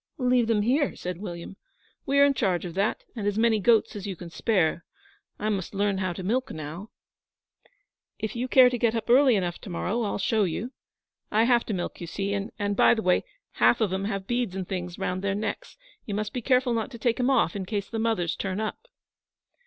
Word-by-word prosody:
'Leave 250 -3 +2
them 215 -2 +2
here,' 270 +6 +1
said 180 -1 -5
William 175 -1 -7 0.5
'we 275 - +2
are 280 - +7
in 285 - +3
charge 190 -9 0
of 170 - -6
that 195 +4 0
and 210 -3 -3
as 205 0 0
many 225 -1 +3
goats 225 +2 +3
as 205 -1 -5
you 195 - -4
can 170 0 -10
spare. 175 -6 +1 0.5
I 210 - -3
must 195 -2 -3
learn 200 -1 +1
how 185 -1 -1
to 185 - -7
milk 250 +7 0
now.' 155 +7 -7 1.3
'If 220 0 -4
you 245 +2 -2
care 255 0 +7
to 245 - -2
get 230 0 +2
up 230 +1 -1
early 260 -1 +6
enough 175 -3 -1
to - - -9
morrow 185 +6 -2
I'll 210 - -1
show 215 +2 +1
you. 200 +7 -2 0.6
I 220 +1 +3
have 240 0 +3
to 215 - -1
milk, 175 - -5
you 170 - -5
see; 195 +3 -2
and, 205 0 -2
by - - +5
the 220 - -3
way, 180 0 +3 0.4
half - - +5
of 210 -5 +1
em 190 +1 -1
have 195 -2 -3
beads 240 -4 -1
and 190 -2 -4
things 180 -2 -4
round 185 -1 -2
their 195 0 -1
necks. 210 0 -4 0.3
You 205 - -3
must 210 0 -3
be 250 - -3
careful 255 0 +2
not 225 -2 -1
to 245 - -9
take 235 +2 0
'em 250 +1 +2
off, 230 -11 +2
in 190 -2 -4
case 205 -1 -2
the 225 - -4
mothers 220 -7 0
turn 190 0 -3
up.' 220 - -4
205 Hz, 225 wpm, -26 LUFS, 190-235 Hz, 1.3 s, are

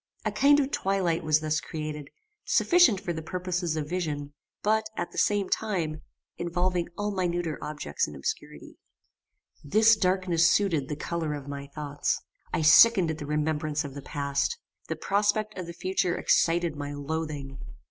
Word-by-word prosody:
A - - +1
kind 285 +1 +5
of 275 -1 0
twilight 190 -4 0
was 155 -1 +3
thus 155 -1 0
created, 150 -2 -6 0.3
sufficient 345 - +4
for 180 -3 -3
the 160 - -5
purposes 180 -1 -2
of 155 -2 -3
vision; 150 -5 -3 0.3
but, 220 +1 +2
at - - -3
the - - -12
same 205 -2 +2
time, 170 -9 -2 0.4
involving 175 0 -1
all 205 0 -1
minuter 175 -4 -1
objects 145 - -2
in - - -9
obscurity. 70 - -6 0.8
This 215 +9 +5
darkness 185 -4 +2
suited 165 -9 +1
the 150 - -2
colour 160 0 -3
of 145 -1 -8
my 140 0 -6
thoughts. 145 0 -2 0.3
I 165 - 0
sickened 175 +3 +7
at 160 - -6
the 145 - -6
remembrance 150 0 -1
of 140 - -7
the 140 - -7
past. 140 - -1 0.3
The - - -2
prospect 210 +1 0
of 185 -2 -6
the - - -5
future 180 0 0
excited 170 -1 +2
my 145 0 -5
loathing. 145 -2 -4
165 Hz, 160 wpm, -27 LUFS, 150-185 Hz, 0.8 s, sickened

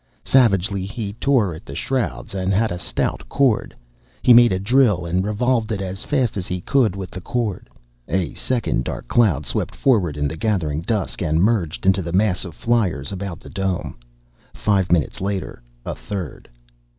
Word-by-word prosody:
Savagely, 100 -6 +3
he 100 0 -5
tore 120 -5 +2
at 80 - -10
the 70 - -9
shrouds 130 - -2
and 95 0 -1
had 110 +2 +2
a 90 - -3
stout - - -2
cord. 130 -6 +1 0.5
He 125 - +7
made 120 0 +7
a 95 - +1
drill 105 -3 +3
and 90 +2 0
revolved 110 +2 0
it 105 - -1
as 95 0 -5
fast 130 -8 0
as 95 - -3
he 90 0 -2
could 115 0 +2
with 95 -2 -6
the 95 - -7
cord.... 110 -1 -3 0.4
A 90 0 -1
second 125 -3 -1
dark - - -5
cloud 90 - +3
swept - - -2
forward 95 - +2
in 75 0 0
the 80 - -4
gathering 80 -7 -1
dusk 105 +3 -2
and 80 -1 +1
merged 95 -5 +1
into 95 0 +4
the 85 -1 -5
mass 100 0 +2
of 85 -3 -9
fliers 100 - 0
about 95 -3 -5
the - - -12
dome. 95 -2 -2 0.6
Five 100 -3 +1
minutes 85 -1 +1
later, 95 -9 -3 0.2
a - - -3
third. 95 -8 -6
100 Hz, 180 wpm, -21 LUFS, 90-115 Hz, 0.6 s, He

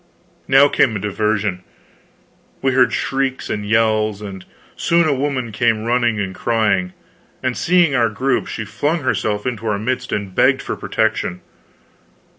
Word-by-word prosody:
Now 135 +1 +6
came 120 -5 +2
a - - -2
diversion. 105 -2 -1 1.0
We 135 - +3
heard 130 -1 +4
shrieks 135 -1 -2
and 105 0 -3
yells, 110 -2 +2
and 100 -3 -8 0.3
soon 170 -1 +2
a 150 - +2
woman 135 -4 -2
came 115 0 +1
running 120 -2 +1
and 95 -2 -3
crying; 100 -5 0 0.5
and 130 -1 0
seeing 175 -4 +3
our 120 -3 +3
group, 125 +5 -1
she 110 - -5
flung 150 +10 -1
herself 105 -5 -1
into 115 -3 -3
our 105 -1 0
midst 125 +5 -3
and 100 -2 -3
begged - - +3
for - - -3
protection. 110 -5 -1
110 Hz, 150 wpm, -19 LUFS, 105-130 Hz, 1.0 s, Now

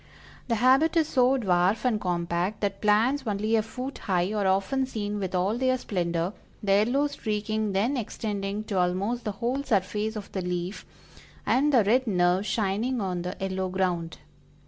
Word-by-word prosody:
The 235 - +1
habit 265 +8 +4
is 320 -2 +3
so 255 +1 +3
dwarf 190 0 +1
and 220 -4 +1
compact 175 +3 -1
that 200 -1 -2
plants 225 +7 +3
only 215 +2 0
a 220 - +3
foot 255 +5 -6
high 185 0 0
are 205 -2 +1
often 200 +8 +1
seen 210 -4 -3
with 190 -2 -3
all 195 +6 +1
their 255 0 +2
splendor, 175 -4 -2 0.3
the 200 - +1
yellow 240 +8 +3
streaking 215 -5 -2
then 220 +9 +1
extending 205 -3 -3
to 200 -3 -2
almost 195 +7 0
the 210 - -2
whole 240 +6 -1
surface 215 -3 -1
of 210 -2 -7
the 190 - -3
leaf, 180 +2 -4 0.6
and 290 +4 +3
the 245 -6 +5
red 245 +5 +2
nerves 180 0 +2
shining 220 +4 0
on 185 -3 -2
the 180 +2 -5
yellow 190 -1 -2
ground. 180 -3 -1
210 Hz, 170 wpm, -27 LUFS, 190-240 Hz, 0.6 s, the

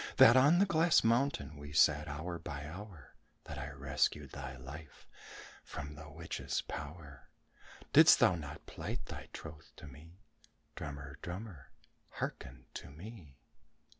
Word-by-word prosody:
That 115 - +9
on 145 +6 +7
the 195 - +5
glass 170 -2 +4
mountain 115 - +1
we 75 0 -9
sat 75 0 +5
hour 80 +4 -4
by 75 -3 -6
hour? 90 - -10 0.3
That - - -7
I 75 - -4
rescued 70 -1 0
thy 65 -1 -6
life 75 +5 -11 0.6
from 75 +1 -7
the 75 0 -10
witch's 80 +3 -3
power? 75 -1 -8 0.6
Didst - - +9
thou - - +6
not 75 -4 -7
plight - - -5
thy - - -8
troth 80 -1 -10
to - - -11
me? 75 +5 -13 0.6
Drummer, 70 -1 -7
drummer, 90 - -7 0.4
hearken - - -5
to - - -7
me!" 80 - -11
75 Hz, 135 wpm, -34 LUFS, 70-90 Hz, 0.6 s, That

